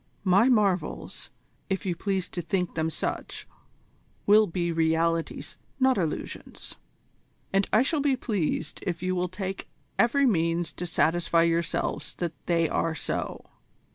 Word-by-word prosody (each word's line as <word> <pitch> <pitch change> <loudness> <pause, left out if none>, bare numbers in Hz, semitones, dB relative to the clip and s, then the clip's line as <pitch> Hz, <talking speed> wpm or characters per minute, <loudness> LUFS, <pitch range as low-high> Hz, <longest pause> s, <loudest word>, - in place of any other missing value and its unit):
My 200 +6 +5
marvels, 205 -7 0 0.4
if 195 0 -1
you 180 -2 0
please 190 0 -1
to 175 - -4
think 180 +1 -1
them 160 0 0
such, 160 - -4 0.8
will 210 +1 +6
be 170 0 -1
realities, 165 0 0 0.2
not 260 -1 +4
illusions; 165 -6 -4 0.8
and 195 0 +2
I 220 +3 +5
shall 295 +1 +1
be 275 -2 +3
pleased 175 -9 -2
if 175 -1 -2
you 185 0 +1
will 180 0 0
take 190 +1 -5 0.3
every 275 +4 +4
means 170 -6 +1
to 180 - -5
satisfy 165 0 +2
yourselves 165 -2 -1
that 170 -2 -3
they 165 -2 +3
are 165 +1 0
so. - - -3
180 Hz, 140 wpm, -27 LUFS, 165-200 Hz, 0.8 s, will